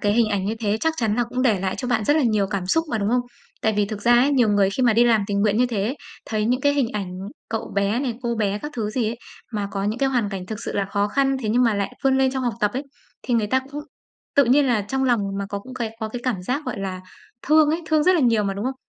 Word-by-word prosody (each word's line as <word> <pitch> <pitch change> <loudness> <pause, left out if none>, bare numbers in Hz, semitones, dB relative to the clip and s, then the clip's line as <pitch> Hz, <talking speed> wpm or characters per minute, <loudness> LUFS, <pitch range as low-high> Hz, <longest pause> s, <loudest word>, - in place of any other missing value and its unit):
cái 205 0 +2
hình 230 -1 +3
ảnh 200 -2 -1
như 215 - -1
thế 210 -1 +1
chắc 320 0 +1
chắn 220 -4 0
là 240 - +2
cũng 250 +2 -3
để 215 -8 +2
lại 190 -1 -1
cho 250 - -3
bạn 225 -3 +1
rất 290 +8 +3
là 310 - +3
nhiều 215 -5 +2
cảm 195 -3 -3
xúc 325 - +2
mà, 225 - 0
đúng 200 0 0
không? 250 0 +3 0.4
Tại 220 - +2
vì 205 - +3
thực 205 0 -6
ra 240 - +4
ấy, 250 +4 +5
nhiều 245 -5 +3
người 200 -1 +3
khi 260 - -2
mà 240 -3 +5
đi 235 +2 +4
làm 225 -4 +3
tình 200 -1 -1
nguyện 210 0 +2
như 250 +1 +3
thế 220 -5 -2
ấy, 260 +7 -2 0.3
thấy 215 -1 -1
những 250 +3 +1
cái 285 -1 +3
hình 270 -5 +1
ảnh 195 -4 -3 0.4
cậu 225 -1 -4
bé 200 +4 +1
này, 255 -4 -2
cô 235 -1 -1
bé 205 -2 0
các 295 +6 -7
thứ 215 -2 -2
gì 230 -1 -1
ấy 230 - -4 0.4
mà 205 -2 -2
có 195 0 -3
những 215 +3 -1
cái 275 - +2
hoàn 245 -6 0
cảnh 190 -2 -6
thực 215 0 -5
sự - - -4
là 200 - 0
khó 205 0 +1
khăn, 270 +4 +1
thế 215 - -2
nhưng 245 +3 +3
mà 230 -3 +3
lại 200 -1 -2
vươn 265 0 +3
lên 265 -1 +3
trong 265 0 -3
học 240 -2 -1
tập 210 0 +2
ấy, 265 - -2 0.4
thì 245 - -1
người 220 -2 +2
ta 260 +5 +2
cũng 295 - -5 0.5
tự 280 - +6
nhiên 275 +4 +4
là 240 -4 +2
trong 265 +6 -2
lòng 240 -4 +3 0.2
mà 200 - -3
có 200 - -3
cũng 255 +6 -11
cái 225 -3 -4
có 220 - -2
cái 240 +2 -6
cảm 235 -8 -2
giác, 265 +10 -2
gọi 250 - -3
là, 190 -2 -4 0.5
thương 305 0 +5
ấy, 335 +2 -1
thương 310 -1 +2
rất 370 - +5
là 335 - +2
nhiều 230 -4 +3
mà, 195 -1 -1
đúng 200 - -4
không? 260 +1 -1
225 Hz, 320 wpm, -23 LUFS, 205-255 Hz, 0.5 s, tự